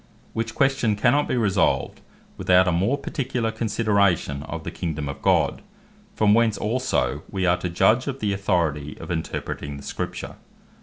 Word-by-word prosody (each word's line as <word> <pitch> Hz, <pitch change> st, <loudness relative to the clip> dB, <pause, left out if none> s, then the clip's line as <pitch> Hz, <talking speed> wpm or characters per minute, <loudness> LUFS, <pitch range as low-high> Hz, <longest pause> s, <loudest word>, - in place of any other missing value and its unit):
Which 110 Hz, 0 st, -3 dB
question 135 Hz, -6 st, +2 dB
cannot 125 Hz, +7 st, +2 dB
bee -, -, 0 dB
resolved, 100 Hz, -6 st, +1 dB, 0.3 s
without 90 Hz, +1 st, +4 dB
a -, -, +3 dB
more 95 Hz, +11 st, +1 dB
particular 125 Hz, -6 st, -2 dB
consideration 100 Hz, -9 st, +1 dB
of -, -, -6 dB
the -, -, -5 dB
Kingdome 75 Hz, -4 st, -4 dB
of 70 Hz, -, -7 dB
God; -, -, +2 dB, 0.5 s
from 105 Hz, -1 st, +4 dB
whence 115 Hz, -2 st, +3 dB
also, 115 Hz, -, 0 dB
wee 95 Hz, -1 st, -1 dB
are 90 Hz, 0 st, +3 dB
to 90 Hz, 0 st, -3 dB
judge 110 Hz, +9 st, +3 dB
of 135 Hz, -1 st, -3 dB
the 105 Hz, -4 st, 0 dB
Authority 85 Hz, -7 st, -1 dB
of -, -, -7 dB
Interpreting 70 Hz, -3 st, -4 dB
the 70 Hz, -, -10 dB
Scripture. -, -, -5 dB
100 Hz, 160 wpm, -24 LUFS, 85-115 Hz, 0.5 s, without